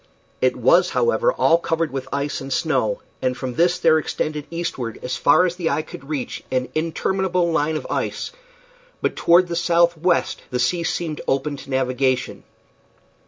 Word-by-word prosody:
It -, -, +3 dB
was, -, -, +4 dB
however, 485 Hz, +1 st, +2 dB
all 165 Hz, -, +3 dB
covered 165 Hz, -1 st, -1 dB
with 135 Hz, -1 st, -4 dB
ice 140 Hz, +1 st, -2 dB
and 135 Hz, 0 st, -7 dB
snow, -, -, 0 dB, 0.2 s
and 130 Hz, 0 st, 0 dB
from 130 Hz, -2 st, -4 dB
this 175 Hz, +5 st, +2 dB
there 160 Hz, -3 st, +4 dB
extended 150 Hz, -1 st, -3 dB
eastward 150 Hz, -9 st, -4 dB
as 125 Hz, 0 st, -2 dB
far 180 Hz, +8 st, +4 dB
as 180 Hz, 0 st, -2 dB
the 170 Hz, -3 st, 0 dB
eye 155 Hz, -, 0 dB
could 140 Hz, -1 st, -11 dB
reach 145 Hz, -5 st, -4 dB
an 130 Hz, 0 st, -1 dB
interminable 175 Hz, +2 st, 0 dB
line 160 Hz, -1 st, +1 dB
of -, -, -7 dB
ice, -, -, -3 dB, 0.7 s
but -, -, -1 dB
toward 175 Hz, +2 st, +4 dB
the 170 Hz, -, -3 dB
southwest 170 Hz, 0 st, +2 dB
the 125 Hz, -, -2 dB
sea 170 Hz, +8 st, +1 dB
seemed 160 Hz, -2 st, -2 dB
open 135 Hz, +2 st, 0 dB
to 135 Hz, +1 st, -12 dB
navigation. 130 Hz, -1 st, 0 dB
155 Hz, 165 wpm, -22 LUFS, 135-170 Hz, 0.7 s, was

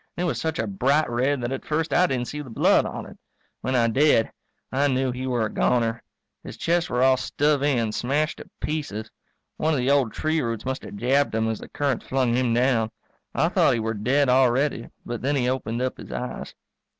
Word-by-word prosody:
And 175 Hz, -, -1 dB
it -, -, +1 dB
was 125 Hz, -8 st, -2 dB
such 160 Hz, +2 st, -2 dB
a 110 Hz, -, 0 dB
bright 135 Hz, +10 st, +1 dB
red 130 Hz, +3 st, +1 dB
that 120 Hz, +1 st, -2 dB
at 135 Hz, -, -4 dB
first 160 Hz, +1 st, -1 dB
I 180 Hz, -, +4 dB
didn't 125 Hz, -5 st, -1 dB
see 150 Hz, +4 st, -5 dB
the 140 Hz, -, -9 dB
blood 115 Hz, -, +3 dB
on -, -, -6 dB
it. -, -, -13 dB, 0.4 s
When 130 Hz, -, -2 dB
I 120 Hz, -2 st, +4 dB
did 130 Hz, -1 st, +3 dB, 0.4 s
I 140 Hz, +2 st, +2 dB
knew 130 Hz, -1 st, +1 dB
he 130 Hz, +1 st, -4 dB
were 120 Hz, -3 st, +1 dB
a 105 Hz, -, -5 dB
goner. 115 Hz, -2 st, +1 dB, 0.4 s
His -, -, -9 dB
chest 170 Hz, +1 st, 0 dB
were 125 Hz, +1 st, +1 dB
all 130 Hz, 0 st, +5 dB
stove 145 Hz, +2 st, +1 dB
in, 125 Hz, -6 st, +1 dB
smashed 145 Hz, +7 st, -1 dB
to -, -, -11 dB
pieces. 140 Hz, -9 st, -4 dB, 0.5 s
One 160 Hz, +1 st, +1 dB
of -, -, 0 dB
the 125 Hz, +2 st, +2 dB
old 135 Hz, -6 st, +3 dB
tree 155 Hz, 0 st, 0 dB
roots 115 Hz, -2 st, -3 dB
must 130 Hz, 0 st, -2 dB
have -, -, -8 dB
jabbed 130 Hz, +4 st, +1 dB
him 110 Hz, 0 st, +1 dB
as 110 Hz, -, -3 dB
the -, -, -10 dB
current 140 Hz, -4 st, -1 dB
flung 130 Hz, -3 st, 0 dB
him 125 Hz, -1 st, +1 dB
down. 120 Hz, -2 st, +2 dB, 0.5 s
I -, -, +2 dB
thought -, -, +3 dB
he -, -, -1 dB
were 110 Hz, 0 st, -1 dB
dead 130 Hz, +7 st, +1 dB
already, 130 Hz, 0 st, +2 dB, 0.2 s
but 120 Hz, -1 st, -4 dB
then 140 Hz, +4 st, 0 dB
he 125 Hz, -3 st, +1 dB
opened 125 Hz, -2 st, -1 dB
up 130 Hz, -, -3 dB
his -, -, -9 dB
eyes. 125 Hz, -, -5 dB
130 Hz, 225 wpm, -24 LUFS, 115-145 Hz, 0.5 s, all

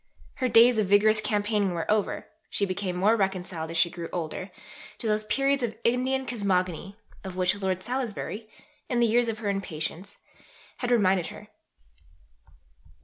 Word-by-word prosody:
Her 255 Hz, -, +1 dB
days 235 Hz, 0 st, +6 dB
of 210 Hz, -, +1 dB
vigorous 215 Hz, +2 st, +4 dB
campaigning 205 Hz, -3 st, 0 dB
were 165 Hz, -1 st, -2 dB
over; 210 Hz, -1 st, 0 dB, 0.2 s
she 200 Hz, -, 0 dB
became 185 Hz, -1 st, -3 dB
more 200 Hz, +5 st, +4 dB
reconciled, 185 Hz, -5 st, -1 dB
as 165 Hz, -, -3 dB
she 170 Hz, +1 st, +3 dB
grew 170 Hz, -1 st, -6 dB
older, 175 Hz, +2 st, -4 dB, 0.5 s
to -, -, -8 dB
those 215 Hz, 0 st, +1 dB
"periods 275 Hz, +5 st, +1 dB
of 230 Hz, -3 st, -2 dB
Indian 260 Hz, +2 st, +1 dB
cosmogony" 195 Hz, -5 st, -1 dB, 0.3 s
of 190 Hz, -2 st, -7 dB
which 185 Hz, -1 st, +3 dB
Lord 185 Hz, -1 st, -1 dB
Salisbury, 230 Hz, -3 st, -4 dB, 0.4 s
in 245 Hz, -, +1 dB
the 235 Hz, -, +5 dB
years 235 Hz, +1 st, +3 dB
of 225 Hz, -1 st, -2 dB
her 215 Hz, -2 st, -3 dB
impatience, 190 Hz, -1 st, -4 dB, 0.6 s
had 245 Hz, -, -2 dB
reminded 195 Hz, -7 st, +3 dB
her. -, -, -11 dB
205 Hz, 155 wpm, -27 LUFS, 185-230 Hz, 0.6 s, days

